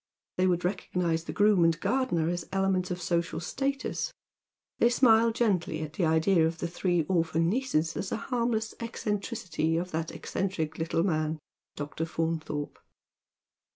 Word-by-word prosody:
They 185 +1 +3
would 175 -1 +1
recognise 180 -3 -1
the - - -4
groom 205 -3 +4
and 165 0 +3
gardener 250 -12 +1
as 175 -1 -2
elements 195 -1 +1
of 180 -1 -3
social 170 -2 -1
status. 275 - -2 0.7
They 235 - +5
smile 230 -2 +5
gently 190 -9 0
at 150 0 -7
the 170 +1 +1
idea 160 +1 +4
of 165 0 -4
the 170 - -2
three 175 0 0
orphan 165 -1 +1
nieces 195 - 0
as 190 - -3
a - - 0
harmless 230 -2 -1
eccentricity 205 -8 -2
of 180 +2 -3
that 160 0 -2
eccentric 160 -5 -3
little 165 +1 +1
man, 155 -3 0 0.4
Dr. 150 +2 -4
Faunthorj^. 160 -2 -2
175 Hz, 150 wpm, -29 LUFS, 160-210 Hz, 0.7 s, They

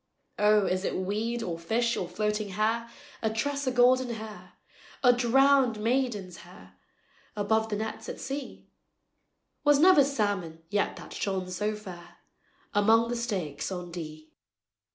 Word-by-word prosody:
"O, 210 -1 +4
is 185 0 0
it - - -2
weed, 215 +5 -2
or 170 -5 -4
fish, 230 +7 0
or 180 - -3
floating 210 +2 -1
hair, 225 +4 -1 0.3
A 220 - +1
tress 280 +6 -2
o' - - +2
golden 250 +1 +4
hair, 215 -1 -9 0.5
O' 245 -1 +7
drownèd 255 0 +4
maiden's 215 -5 -1
hair, 95 - -15 0.6
Above 220 +2 +1
the 210 - -1
nets 220 +1 -5
at - - -6
sea? 275 0 -6 1.0
Was 290 -1 +5
never 325 -1 +7
salmon 205 - -2
yet 205 0 0
that - - -10
shone 190 -2 -2
so 210 +4 -1
fair, 185 -5 -11 0.6
Among 225 +3 +4
the 240 - -1
stakes 190 - -3
on 180 -2 -5
Dee." 155 -2 -8
215 Hz, 145 wpm, -28 LUFS, 185-240 Hz, 1.0 s, O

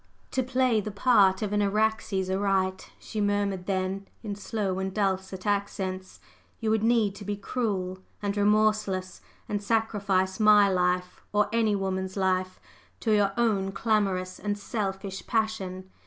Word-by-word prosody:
"To 260 - +1
play 255 -3 +2
the 215 - -5
part 200 -3 +4
of 210 -1 -2
an 205 - +2
Araxes 205 -2 +1
aright," 190 -1 0
she 215 - -4
murmured 205 -2 0
then 190 0 -2 0.2
in 210 -2 -3
slow 200 -2 -2
and 190 0 -2
dulcet 190 -2 -2
accents, 190 -2 -2 0.4
"you 220 -2 0
would 220 -1 +2
need 225 -3 +3
to 205 - -10
be 205 +1 -2
cruel 200 -4 -2 0.2
and 200 -1 -2
remorseless, 205 -2 +1 0.3
and 205 -1 -2
sacrifice 200 -3 0
my 210 -1 +7
life 180 -1 0
or 210 0 +2
any 220 -3 +2
woman's 190 0 -2
life 185 -1 0 0.4
to 225 - +1
your 200 -1 +3
own 200 -5 +1
clamorous 195 -5 0
and 205 -1 -2
selfish 195 -2 -4
passion. 195 -5 -1
200 Hz, 145 wpm, -27 LUFS, 190-215 Hz, 0.4 s, my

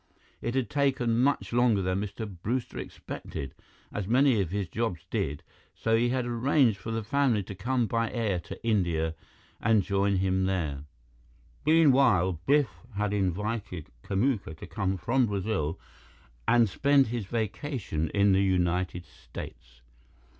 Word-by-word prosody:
It 120 +2 -2
had 130 -3 +1
taken 135 -5 +1
much 135 -1 +1
longer 120 -5 +3
than 95 +1 0
Mr. 105 +2 -5
Brewster 120 +5 -2
expected 70 -1 -7 0.4
as 105 -3 -3
many 125 -1 +4
of 90 - -2
his 100 0 -2
jobs 110 -5 -3
did 75 +1 -2 0.3
so 115 0 +1
he 120 +2 +2
had 125 0 0
arranged 120 -2 +2
for 105 - -7
the 115 0 -2
family 120 -3 +2
to 100 - -8
come 120 +6 0
by 115 +1 0
air 110 -7 0
to 85 +7 -10
India 85 -7 +1 0.5
and 110 -2 +3
join 100 +1 +1
him 95 0 +1
there. 75 -7 -2 0.8
Meanwhile, 130 - +4
Biff 140 -6 +4 0.2
had 105 0 0
invited 100 -2 -2
Kamuka 100 - -1
to - - -8
come 95 -3 -2
from 120 +7 +2
Brazil 95 -5 -2 0.7
and 120 -1 +5
spend 140 +7 +3
his 115 -4 -3
vacation 110 - -2
in 100 0 +3
the 95 0 +4
United 90 -2 0
States. 60 -4 -11
105 Hz, 145 wpm, -28 LUFS, 95-120 Hz, 0.8 s, and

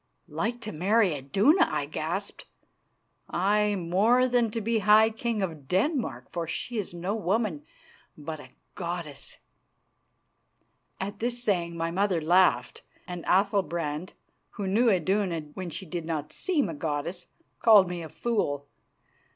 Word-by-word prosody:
"Like 240 +1 -3
to 220 -1 -5
marry 195 +3 +2
Iduna?" 195 - +3
I - - -1
gasped. - - -4 0.8
"Aye, 205 +3 +2
more 200 +8 +3
than 240 -2 +2
to 230 - -3
be 225 +1 0
High 215 +2 +6
King 225 -2 -2
of 160 -7 -5
Denmark, 190 - -1
for 170 -1 -3
she 230 +7 -3
is 200 - -4
no 175 +3 -3
woman, 205 -6 -1 0.5
but 155 +1 -6
a 130 - -12 0.2
goddess." 170 -5 -6 1.6
At 200 +2 -5
this 240 +1 -2
saying 170 -6 0
my 165 0 -1
mother 190 -1 +1
laughed, 180 +4 +3 0.3
and 175 -2 -6
Athalbrand, 180 -5 0 0.4
who 205 - -4
knew 225 +6 +3
Iduna 185 -2 +1
when 185 -2 -5
she 190 - -5
did 170 -1 -5
not 155 -2 -4
seem 320 - 0
a 165 - -4
goddess, 155 +4 -4 0.3
called 210 -4 +7
me 175 -1 -4
a 160 - -7
fool. 145 -13 -1
190 Hz, 140 wpm, -27 LUFS, 165-215 Hz, 1.6 s, called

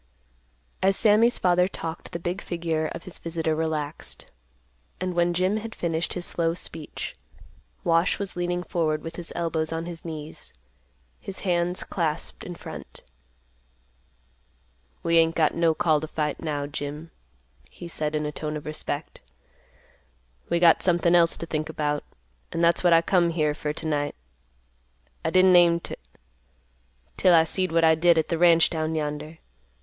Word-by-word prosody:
As 195 0 +5
Sammy's 225 +2 +4
father 180 0 +3
talked, 165 -3 -7
the 170 - -3
big 175 +3 -3
figure 165 -2 -2
of 165 - -7
his 185 - -6
visitor 165 -1 -2
relaxed, 155 -2 -4 0.7
and 185 0 -2
when 175 0 +2
Jim 185 +4 +1
had 225 +1 -6
finished 165 -1 -2
his 175 -1 -4
slow 165 -1 -1
speech, 160 -3 -6 0.7
Wash 165 +1 +2
was 200 -2 -5
leaning 175 0 -1
forward 155 -4 -1
with 165 0 -7
his 175 -1 -5
elbows 165 -2 -1
on 165 0 -3
his 170 -1 -7
knees, 155 -2 -8 0.7
his 195 - -6
hands 175 -1 0
clasped 165 -3 -2
in 175 - -7
front. - - -10 2.0
"We 165 0 +4
ain't 165 0 +3
got 155 -2 +3
no 165 -1 +2
call 155 -3 +2
t' 155 - -4
fight, 150 -2 -2
now, 145 -3 -2
Jim," 145 +3 -6 0.6
he 175 - -10
said 155 -2 -2
in 150 0 -1
a 150 - -2
tone 150 0 -4
of 150 - -10
respect. 155 0 -5 1.3
"We 170 - +2
got 170 -2 +6
something 175 -1 +3
else 170 -1 +4
t' - - -4
think 155 -1 -3
about; 150 -2 -1 0.5
an' 165 - -2
that's 170 +1 +3
what 175 - +5
I 165 0 +6
come 175 -2 +3
here 155 -3 +1
fer 150 0 -3
t'night. 150 -1 -2 1.1
I - - +1
didn't 185 +2 +5
aim 170 -1 +6
t', - - -7 1.2
'til 180 -2 +5
I 160 - +6
seed 185 +2 0
what 165 0 +3
I 160 0 +6
did 170 +1 +4
at 160 - +1
th' 165 - -1
ranch 170 -1 +5
down 160 -1 -2
yonder. 150 +1 -4
165 Hz, 160 wpm, -25 LUFS, 155-175 Hz, 2.0 s, got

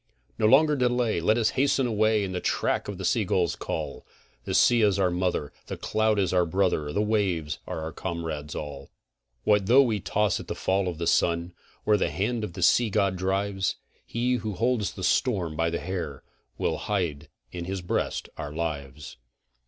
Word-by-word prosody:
No 110 - +4
longer 150 +5 +5
delay, 125 -6 +1
let 110 +7 +3
us 115 -2 +2
hasten 135 0 +2
away 110 -2 +2
in 95 - -3
the 90 - -2
track - - 0
of 100 -2 -5
the 95 - -4
sea 115 +3 +2
gull's 90 -3 +1
call, - - -5 0.4
The - - -2
sea 120 -1 +5
is 100 -2 +3
our 95 -2 +2
mother, 90 -5 -1
the - - -5
cloud 110 0 +1
is 95 -3 +1
our 90 -1 +4
brother, 85 -4 0
the 105 +7 +1
waves 95 -9 0
are - - -4
our 80 0 -4
comrades 80 -2 -5
all. 70 -2 -6 0.5
What 105 -2 +3
though 130 +5 +7
we 110 -5 0
toss 105 +1 0
at - - -9
the - - -4
fall 95 0 0
of 85 -3 -3
the 85 - -3
sun 85 +1 +1 0.3
where 105 -1 +4
the - - 0
hand 110 +3 -1
of 105 - -5
the 90 -1 -3
sea 115 +6 +4
god 100 -1 +1
drives? 95 0 -1 0.3
He 125 +2 0
who 110 -2 -4
holds 115 0 0
the 95 - -7
storm 90 -7 +1
by 80 +1 +1
the 85 - -2
hair, 85 -7 -5 0.3
will - - 0
hide 85 -8 -2 0.2
in 85 -1 -5
his 95 +1 -3
breast 90 - -2
our 75 - -5
lives. 75 -4 -5
95 Hz, 195 wpm, -26 LUFS, 85-110 Hz, 0.5 s, though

